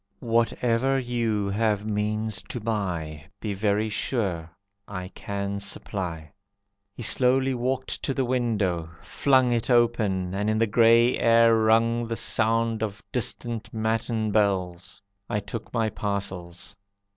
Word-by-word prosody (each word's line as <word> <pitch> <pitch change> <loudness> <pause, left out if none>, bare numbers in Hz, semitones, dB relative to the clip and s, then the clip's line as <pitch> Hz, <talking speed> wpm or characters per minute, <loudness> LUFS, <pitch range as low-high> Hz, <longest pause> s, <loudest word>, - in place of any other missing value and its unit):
Whatever 115 +3 +1
you 115 -5 -1
have 105 0 0
means 105 +1 -1
to 135 -6 -4
buy 90 -9 -3 0.2
Be 105 -2 -3
very 105 +2 +1
sure 100 -7 -2 0.4
I 95 -2 -6
can 100 0 -4
supply." 90 -5 -3 0.6
He 120 - -6
slowly 130 +3 +3
walked 130 +2 -2
to 135 - -2
the 135 - +1
window, 105 -10 0
flung 130 -3 +3
It 120 0 0
open, 110 -7 +2
and 105 +2 -1
in 110 - +1
the 115 - +3
grey 115 +2 +4
air 115 0 +5
rung 115 +1 +3
The 115 - -2
sound 115 0 +1
of 105 -2 -4
distant 115 -2 -3
matin 110 0 -1
bells. 95 -4 0 0.3
I 105 - 0
took 105 +2 -7
my 115 -2 +1
parcels. 95 -3 -4
110 Hz, 130 wpm, -26 LUFS, 100-115 Hz, 0.6 s, air